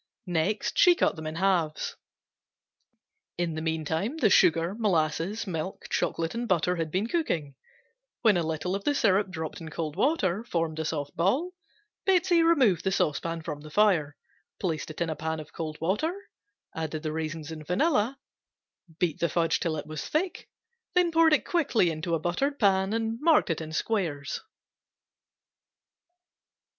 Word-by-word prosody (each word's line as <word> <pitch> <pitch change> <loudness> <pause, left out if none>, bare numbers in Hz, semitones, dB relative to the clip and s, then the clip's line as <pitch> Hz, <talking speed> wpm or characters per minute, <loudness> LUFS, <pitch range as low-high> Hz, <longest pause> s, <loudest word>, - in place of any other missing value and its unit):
Next 180 +4 -1
she 355 -2 +7
cut - - +1
them 160 -1 -6
in 155 - -5
halves. 170 -4 0 1.4
In 170 -2 -1
the 155 - -4
meantime 160 - -2
the 220 -10 +3
sugar, 165 +2 +4
molasses, 190 -1 0
milk, 180 0 -4
chocolate 165 0 -1
and 235 +1 -3
butter 180 -2 +1
had 165 -1 -2
been 185 +6 0
cooking; 175 - -1 0.7
when 220 -4 +5
a 175 - +2
little 160 +3 -2
of 195 0 -2
the 290 - +1
syrup 200 -5 +3
dropped 160 -3 -5
in 160 - -7
cold 155 -1 -4
water 215 - +1
formed 165 -8 -2
a 160 - -2
soft 145 0 -3
ball, 245 - +1 0.5
Betsey 360 -2 +4
removed 270 - +4
the 190 - +1
saucepan 165 -2 -1
from 150 -2 -5
the 155 - -10
fire, 165 -6 +2 0.4
placed 160 -5 -2
it 155 - -8
in 170 - +1
a - - -3
pan 160 +1 -3
of 155 0 -10
cold 155 -2 -5
water, 210 - 0 0.6
added 160 -1 -4
the 155 - -2
raisins 160 0 -4
and 155 -2 -8
vanilla, 255 - +1 0.8
beat 175 -1 0
the 170 - +1
fudge 165 +1 +1
till 160 -3 -1
it 145 - -5
was 155 0 -5
thick, 350 +4 -2 0.5
then 355 -1 +4
poured 325 -2 +4
quickly 260 - +2
into 165 +2 -2
a - - -1
buttered 270 - -1
pan 190 -3 +3
and 225 0 -1
marked 310 - +4
in 160 -1 -4
squares. 160 -6 -2
175 Hz, 160 wpm, -28 LUFS, 160-220 Hz, 1.4 s, she